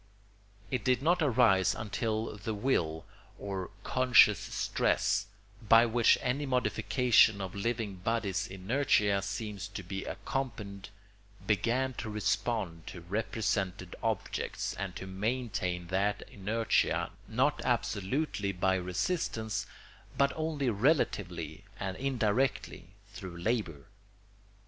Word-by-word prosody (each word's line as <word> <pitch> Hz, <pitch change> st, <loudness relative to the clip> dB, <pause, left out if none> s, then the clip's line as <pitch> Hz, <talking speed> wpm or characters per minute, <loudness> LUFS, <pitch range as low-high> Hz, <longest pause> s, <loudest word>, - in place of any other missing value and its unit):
It 125 Hz, -5 st, -1 dB
did 130 Hz, +2 st, +2 dB
not 175 Hz, +2 st, +3 dB
arise 110 Hz, -, +4 dB
until 110 Hz, +1 st, -2 dB
the 105 Hz, +1 st, -4 dB
will 85 Hz, -9 st, 0 dB, 0.3 s
or 95 Hz, -2 st, -4 dB
conscious 120 Hz, -6 st, +5 dB
stress, 100 Hz, -, 0 dB, 0.3 s
by 115 Hz, +1 st, +6 dB
which 120 Hz, 0 st, +4 dB
any 140 Hz, +3 st, -1 dB
modification 115 Hz, -2 st, +3 dB
of 95 Hz, -2 st, -5 dB
living 110 Hz, -1 st, -2 dB
bodies' 95 Hz, -2 st, -1 dB
inertia 100 Hz, 0 st, +1 dB
seems 100 Hz, -1 st, -4 dB
to 100 Hz, -, -7 dB
be 95 Hz, +1 st, -5 dB
accompanied, 105 Hz, -8 st, -4 dB, 0.6 s
began 120 Hz, +5 st, +1 dB
to 110 Hz, -, -4 dB
respond 105 Hz, -5 st, -1 dB
to 90 Hz, -, -8 dB
represented 95 Hz, -1 st, -2 dB
objects, -, -, -2 dB
and 95 Hz, -2 st, -5 dB
to -, -, -6 dB
maintain 95 Hz, -3 st, -2 dB
that 100 Hz, +2 st, 0 dB
inertia 100 Hz, -5 st, 0 dB, 0.2 s
not 135 Hz, +6 st, +1 dB
absolutely 115 Hz, -1 st, -1 dB
by 95 Hz, 0 st, +1 dB
resistance 105 Hz, -, -1 dB, 0.5 s
but 140 Hz, 0 st, +3 dB
only 155 Hz, -5 st, -1 dB
relatively 95 Hz, -, 0 dB, 0.2 s
and 95 Hz, -1 st, -3 dB
indirectly 125 Hz, -4 st, 0 dB, 0.2 s
through 95 Hz, -3 st, -8 dB
labour. 85 Hz, -, -2 dB
105 Hz, 105 wpm, -31 LUFS, 95-125 Hz, 0.6 s, by